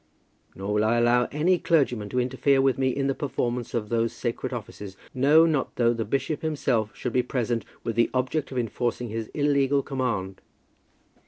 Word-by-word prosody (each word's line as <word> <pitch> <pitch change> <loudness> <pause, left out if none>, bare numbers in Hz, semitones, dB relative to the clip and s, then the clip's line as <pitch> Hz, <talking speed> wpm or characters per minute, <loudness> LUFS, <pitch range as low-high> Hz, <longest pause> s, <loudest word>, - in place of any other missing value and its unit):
Nor 100 +2 -3
will 105 0 +2
I 115 +2 +2
allow 120 +1 +3
any 170 +5 +2
clergyman 125 -12 +1
to 125 - -1
interfere 130 +2 +2
with 135 -1 +2
me 130 -1 +2
in 135 +1 -1
the 135 - +1
performance 125 -4 -3
of 105 -3 -2
those 115 -1 0
sacred 120 +2 -3
offices, 105 -5 -7 0.2
no, 145 +5 +5
not 155 -5 0
though 120 -1 +3
the 115 -1 -3
bishop 140 +6 -2
himself 135 -8 0
should 125 - -4
be 125 - +3
present 120 -2 -2 0.2
with 115 - -3
the 115 0 +3
object 130 +4 -1
of 130 - -5
enforcing 120 0 -2
his 110 0 -4
illegal 140 -1 +2
command." 115 -9 -3
125 Hz, 180 wpm, -26 LUFS, 115-135 Hz, 0.2 s, no